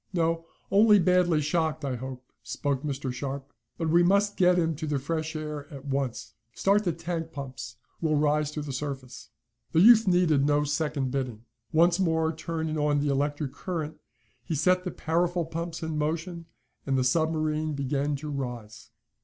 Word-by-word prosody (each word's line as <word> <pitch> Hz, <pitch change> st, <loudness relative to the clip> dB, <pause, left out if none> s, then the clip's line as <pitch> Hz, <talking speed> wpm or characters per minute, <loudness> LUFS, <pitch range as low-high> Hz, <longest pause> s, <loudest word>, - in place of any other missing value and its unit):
"No, 165 Hz, -1 st, 0 dB, 0.2 s
only 210 Hz, +1 st, +6 dB
badly 180 Hz, -3 st, +3 dB
shocked, 155 Hz, 0 st, 0 dB
I 130 Hz, -2 st, -1 dB
hope," 130 Hz, +1 st, -7 dB, 0.2 s
spoke 140 Hz, -3 st, -2 dB
Mr. 140 Hz, -3 st, -3 dB
Sharp. 135 Hz, +1 st, -5 dB, 0.2 s
"But 160 Hz, -2 st, -1 dB
we 170 Hz, +1 st, +6 dB
must 200 Hz, +3 st, +3 dB
get 180 Hz, -1 st, +4 dB
him 165 Hz, -2 st, +1 dB
to 155 Hz, -, -4 dB
the 145 Hz, -1 st, 0 dB
fresh 160 Hz, +3 st, -3 dB
air 150 Hz, -1 st, -5 dB
at 140 Hz, -1 st, -9 dB
once. 135 Hz, -3 st, -3 dB, 0.2 s
Start 200 Hz, +2 st, +2 dB
the 175 Hz, -, +2 dB
tank 165 Hz, 0 st, -4 dB
pumps. 130 Hz, -4 st, -7 dB, 0.3 s
We'll 155 Hz, -2 st, +2 dB
rise 150 Hz, 0 st, +2 dB
to 150 Hz, -, -4 dB
the 140 Hz, -2 st, -5 dB
surface." 135 Hz, -3 st, -6 dB, 0.4 s
The 160 Hz, -, +4 dB
youth 225 Hz, +3 st, +7 dB
needed 175 Hz, -6 st, +3 dB
no 145 Hz, +1 st, +3 dB
second 145 Hz, -3 st, -1 dB
bidding. 125 Hz, -5 st, -3 dB, 0.3 s
Once 170 Hz, +3 st, +4 dB
more 160 Hz, -3 st, +1 dB
turning 160 Hz, -1 st, -3 dB
on 145 Hz, -1 st, +2 dB
the 145 Hz, 0 st, 0 dB
electric 145 Hz, 0 st, -1 dB
current, 160 Hz, -4 st, -4 dB, 0.5 s
he 160 Hz, -, -3 dB
set 180 Hz, +5 st, +2 dB
the -, -, -1 dB
powerful 175 Hz, +1 st, 0 dB
pumps 165 Hz, +1 st, -5 dB
in 160 Hz, -1 st, -2 dB
motion 165 Hz, +2 st, -3 dB, 0.4 s
and 135 Hz, -1 st, 0 dB
the 130 Hz, -, +2 dB
submarine 155 Hz, +2 st, +1 dB
began 140 Hz, +1 st, -1 dB
to 150 Hz, +2 st, -6 dB
rise. 120 Hz, -4 st, -6 dB
155 Hz, 170 wpm, -27 LUFS, 140-170 Hz, 0.5 s, youth